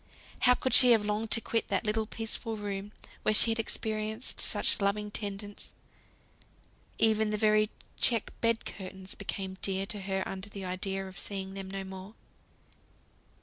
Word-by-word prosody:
How 250 -1 +5
could 260 - -1
she 250 -2 +9
have 215 -2 +2
longed 210 +1 -1
to 230 - +5
quit 230 +1 -1
that - - -1
little 215 0 0
peaceful 225 0 -3
room 205 -1 -4 0.3
where 215 - +2
she 225 - +8
had 225 - -1
experienced 220 +1 -2
such - - +2
loving 205 +1 0
tendence! 205 -1 -5 1.2
Even 220 -1 +3
the 210 - 0
very 215 0 +3 0.3
check 230 -4 +3
bed 230 -1 +1
curtains 190 0 -7
became 190 -1 -5
dear 195 0 0
to 205 +1 -4
her 190 0 -1
under 195 +1 -6
the 200 -2 -7
idea 190 +1 -2
of 190 - -10
seeing 195 -1 -4
them 195 -1 -6
no 195 0 -4
more. 190 +2 -9
205 Hz, 160 wpm, -30 LUFS, 195-220 Hz, 1.2 s, she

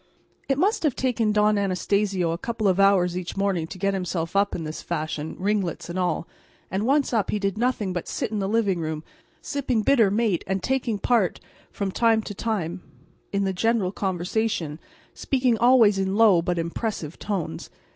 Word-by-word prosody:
It 270 - +2
must 395 +9 +2
have 300 -6 +1
taken 235 -4 +1
Don 210 0 +3
Anastacio 195 -2 0
a 165 - -2
couple 230 -1 -2
of 190 0 +2
hours 190 -3 +4
each 180 +1 -5
morning 195 -5 0
to 185 - -9
get 195 +1 0
himself 180 -2 -3
up 200 0 +2
in 165 - -4
this 155 0 -5
fashion, 155 0 -4
ringlets 195 -4 -1
and 185 - -3
all, 175 -2 -1 0.4
and 195 +5 -1
once 280 -1 +2
up 215 -4 +1
he - - 0
did 195 -2 -1
nothing 220 -5 0
but 175 - -4
sit - - -3
in 215 - -1
the 195 0 -1
living 205 -5 +1
room, 155 -1 -3 0.4
sipping 255 -6 -1
bitter 230 -4 +4
mate 210 -4 +1
and 190 0 -1
taking 255 -5 0
part 205 -3 +1 0.3
from 200 -2 -3
time 225 +1 +2
to 205 - -6
time 190 -5 -3 0.5
in 200 0 0
the 190 -1 0
general 220 -1 +1
conversation, 185 -3 -2 0.3
speaking 255 -3 +1
always 235 -5 +5
in 190 0 0
low 210 -6 +5
but 175 +1 -1
impressive 170 -1 -3
tones. 180 - -4
200 Hz, 185 wpm, -24 LUFS, 180-225 Hz, 0.5 s, always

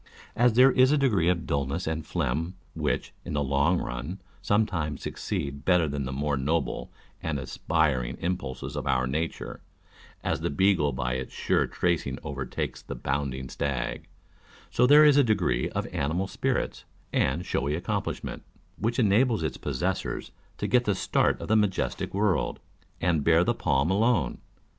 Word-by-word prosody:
As 120 0 +4
there 130 +3 +7
is 130 +2 +5
a 150 - +4
degree 110 - +2
of 85 -2 0
dullness 70 +5 -1
and 80 0 -2
phlegm, 80 +5 -2 0.2
which, - - -2
in - - -6
the 75 -1 +1
long 70 +6 +2
run, 65 +10 -5 0.2
sometimes 90 -9 0
succeeds 70 0 -3
better 90 -3 +3
than 70 -2 -3
the 65 - -4
more 70 +1 -1
noble 80 +5 -1 0.3
and 80 -3 -2
aspiring 65 -1 0
impulses 85 -7 -3
of - - -3
our 65 - +2
nature 80 +6 -3 0.6
(as - - -1
the - - 0
beagle 75 -1 +3
by 65 -1 -2
its 65 0 -4
sure - - +1
tracing 85 -2 -1
overtakes 70 -2 -4
the - - -7
bounding 65 0 -2
stag), 70 0 -3 0.6
so 125 - +4
there 150 +3 +8
is 145 -1 +6
a 145 - +7
degree 105 - +1
of - - -2
animal 80 +7 0
spirits 95 - -2 0.3
and 80 +8 +1
showy 70 -3 0
accomplishment, 85 - -3 0.4
which 115 +2 0
enables 110 -2 +3
its 80 - -2
possessors - - -2
" - - -33
to - - -3
get 125 -1 +3
the 105 - +1
start - - +1
of - - -6
the 110 - +3
majestic 105 -3 0
world," 100 -5 0 0.4
and 85 -4 +2
bear 85 +2 +5
the - - +2
palm 70 +6 +1
alone. 100 - +2
80 Hz, 160 wpm, -27 LUFS, 70-100 Hz, 0.6 s, there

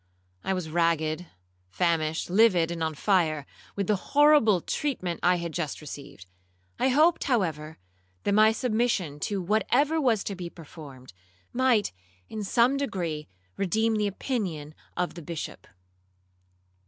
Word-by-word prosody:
I 190 - 0
was 180 -3 -4
ragged, 165 0 0 0.4
famished, 160 - 0
livid, 185 -5 +4
and 170 -1 -5
on 160 -1 -2
fire, 155 -5 +1 0.3
with 200 - -1
the 210 - +2
horrible 285 -3 +4
treatment 185 - -2
I 180 +1 +4
had 170 -1 -4
just 155 -2 -3
received. 140 -10 -10 0.5
I - - +3
hoped, 310 +6 +3
however, 160 - -1 0.5
that - - +1
my 215 +1 +6
submission 220 - 0
to 200 -2 -1
whatever 270 - +2
was 230 -7 +2
to 200 - -4
be 180 -2 -6
performed, 145 - -12 0.4
might, 245 -4 +2 0.4
in 215 -1 -5
some 240 +6 +3
degree, 170 - -3 0.3
redeem 220 +4 +1
the 210 -1 +1
opinion 185 - -3 0.2
of 180 - -1
the 170 - -9
Bishop. 165 0 -7
185 Hz, 135 wpm, -27 LUFS, 160-225 Hz, 0.5 s, my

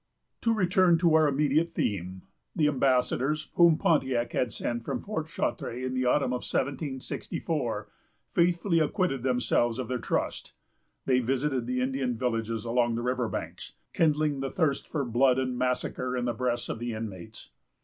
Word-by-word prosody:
To 230 - +2
return 185 -4 +4
to 170 -1 +3
our 160 -1 +5
immediate 150 +4 +1
theme. 95 -2 -2 0.3
The 155 -3 +3
ambassadors, 135 +2 +1
whom 170 -2 +6
Pontiac 130 -10 +1
had 125 -3 0
sent 120 +2 -3
from 130 -1 -3
Fort 160 - -4
Chartres 125 -5 -3
in 130 - -2
the 130 0 0
autumn 125 0 +2
of 125 - -2
1764, 135 0 -3 0.5
faithfully 170 0 +2
acquitted 155 - 0
themselves 125 -2 +1
of 125 -3 -4
their 125 -1 -1
trust. - - -2 0.5
They 130 -1 +3
visited 130 0 -1
the 125 0 -1
Indian 130 -1 -1
villages 115 -2 -2
along 120 0 +1
the 120 - -3
river 125 -2 0
banks, - - -6 0.2
kindling 150 -3 +2
the 135 0 -2
thirst 145 -4 0
for 145 -4 -2
blood 125 +2 +3
and 130 -1 -1
massacre 125 0 -1
in 120 - -1
the 120 - 0
breasts 120 0 -1
of - - -4
the 120 0 -3
inmates. 110 -1 -8
130 Hz, 160 wpm, -28 LUFS, 120-150 Hz, 0.5 s, whom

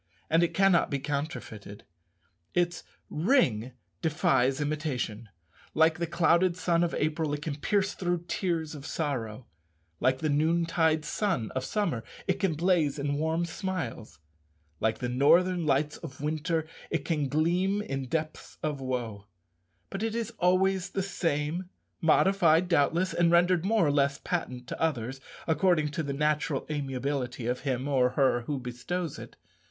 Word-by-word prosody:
And 165 +1 +5
it 170 - +1
cannot 195 -3 +4
be 140 - 0
counterfeited. 140 -8 -5 0.7
Its 175 -1 +1 0.3
ring 140 - +2 0.3
defies 135 -4 +2
imitation. 145 -7 -3 0.5
Like 160 +1 +4
the 170 - -1
clouded 170 +1 +3
sun 175 -2 +2
of 170 - -1
April, 155 -1 0
it 145 - -8
can 150 -2 -3
pierce 200 +5 +1
through 175 -2 -2
tears 165 -5 -1
of 145 -3 -8
sorrow; 130 -8 -3 0.5
like 130 0 +2
the 155 - -2
noontide 160 +1 +2
sun 185 - -1
of 130 - -3
summer, 170 - -1 0.2
it 190 0 0
can 190 -5 +1
blaze 165 -3 +2
in 145 0 -1
warm 160 +2 0
smiles; 165 - -5 0.6
like 110 0 +1
the 125 - -3
northern 170 +7 +3
lights 145 +1 +1
of 140 -5 -9
winter, 160 +2 -1 0.2
it - - -2
can 150 -5 0
gleam 175 +7 +1
in 135 -6 -4
depths 155 +3 -4
of 150 -3 -2
woe; 115 -6 -4 0.6
but 195 - -4
it 225 0 -1
is 230 -2 -2
always 185 +1 +2
the 195 - -2
same, 165 -1 -2 0.3
modified, 170 0 +4
doubtless, 170 +3 +2
and 175 -1 +3
rendered 175 0 +4
more 210 -1 +3
or 145 - +3
less 140 -1 +2
patent 125 -8 -3
to - - -7
others, 135 -4 -1 0.2
according 160 -2 +2
to 150 - -3
the 145 -3 -3
natural 150 0 0
amiability 135 -3 -3
of 125 +1 -1
him 130 -1 -2
or 130 -3 +3
her 130 -3 +3
who 145 -2 -1
bestows 135 +7 -4
it. - - -10
155 Hz, 150 wpm, -28 LUFS, 135-175 Hz, 0.7 s, And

